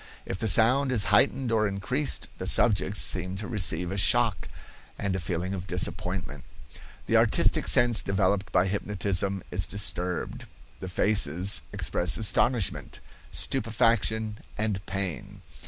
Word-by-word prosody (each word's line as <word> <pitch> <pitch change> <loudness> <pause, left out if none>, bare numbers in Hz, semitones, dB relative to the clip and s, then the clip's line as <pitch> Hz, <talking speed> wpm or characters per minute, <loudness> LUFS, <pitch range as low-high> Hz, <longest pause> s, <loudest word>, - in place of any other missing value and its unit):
If 95 - -5
the 110 - -1
sound 125 +6 +3
is 115 -5 +2
heightened 130 -1 +2
or 110 -1 +1
increased, 90 -8 -2
the - - -4
subjects 105 -3 +4
seem 90 +1 +1
to 105 - -6
receive 90 -5 -1
a 95 - -4
shock 115 0 +2 0.5
and 100 -2 -3
a - - -2
feeling 90 +2 -4
of 95 -1 -6
disappointment. 90 -4 -4 0.6
The - - +2
artistic - - +2
sense 120 -3 +5
developed 95 0 -1
by 90 - +2
hypnotism 100 -1 -2
is 90 - 0
disturbed; 90 -3 -2 0.3
the 95 - -7
faces 95 -1 +1
express - - +1
astonishment, 110 +1 0 0.3
stupefaction 110 -2 0 0.2
and 105 -3 -2
pain. 95 -7 -5
100 Hz, 130 wpm, -26 LUFS, 90-110 Hz, 0.6 s, sense